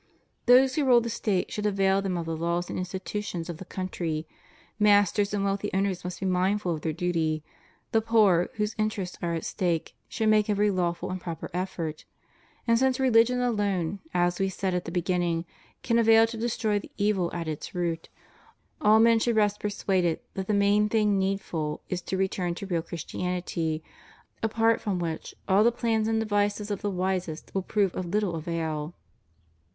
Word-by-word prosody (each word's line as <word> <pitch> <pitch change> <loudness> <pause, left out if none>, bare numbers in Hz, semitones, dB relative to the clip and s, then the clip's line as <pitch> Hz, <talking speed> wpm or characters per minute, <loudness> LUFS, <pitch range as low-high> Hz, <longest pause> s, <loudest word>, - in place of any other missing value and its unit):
Those 255 +2 +6
who 290 0 +1
rule 250 -2 +6
the 235 0 -3
State 205 -5 -1
should 210 0 -1
avail 195 -1 +2
them 190 -2 -2
of 170 - -3
the 165 0 -3
laws 170 +2 -1
and - - -3
institutions 185 -1 -4
of 165 - -8
the 190 - -9
country; 170 -5 -3 0.5
masters 205 -1 +4
and 205 -1 -1
wealthy 200 +1 -1
owners 195 -2 0
must 180 0 -5
be - - -1
mindful 185 0 +1
of 155 - -5
their 160 - -1
duty; 160 -2 -1 0.5
the 225 -2 +3
poor, 210 -6 +4
whose 210 0 -1
interests 210 -4 -2
are 170 -1 -1
at 165 - -4
stake, 170 -3 -1 0.2
should 220 - -1
make 215 0 +3
every 205 0 +2
lawful 175 -2 -1
and 185 -1 -4
proper 170 +1 -6
effort; 175 -4 -4 0.6
and 230 -1 +3
since 265 0 +2
religion 250 -1 +4
alone, 200 -6 0
as 175 0 +1
We 195 0 +1
said 190 0 -2
at 180 0 -1
the 165 - -5
beginning, 175 -1 0 0.4
can 235 -1 +2
avail 225 0 +6
to 225 +1 -6
destroy 220 -2 0
the - - -11
evil 200 -4 +1
at 170 -2 -4
its 155 +2 -5
root, 170 -2 -2 0.7
all 215 +1 +6
men 230 0 +5
should 235 0 +1
rest 210 -1 +2
persuaded 190 -5 0
that 190 -1 -4
the 215 - +1
main 205 +1 +3
thing 210 -2 +2
need 195 +1 0
ful 155 -5 -4
is 180 -1 -2
to 190 - -3
return 185 -2 -1
to 200 - -6
real 175 -4 -1
Christianity, 170 -1 -3 0.6
apart 225 +1 +2
from 200 -3 -1
which 165 -2 -4
all 200 +2 +5
the 235 - +5
plans 225 -2 0
and 225 0 +1
devices 205 -1 0
of 205 - -3
the 205 - -1
wisest 185 -4 -3
will 195 - 0
prove 195 0 0
of 185 - -3
little 200 0 0
avail. 160 -1 -3
195 Hz, 185 wpm, -27 LUFS, 175-210 Hz, 0.7 s, Those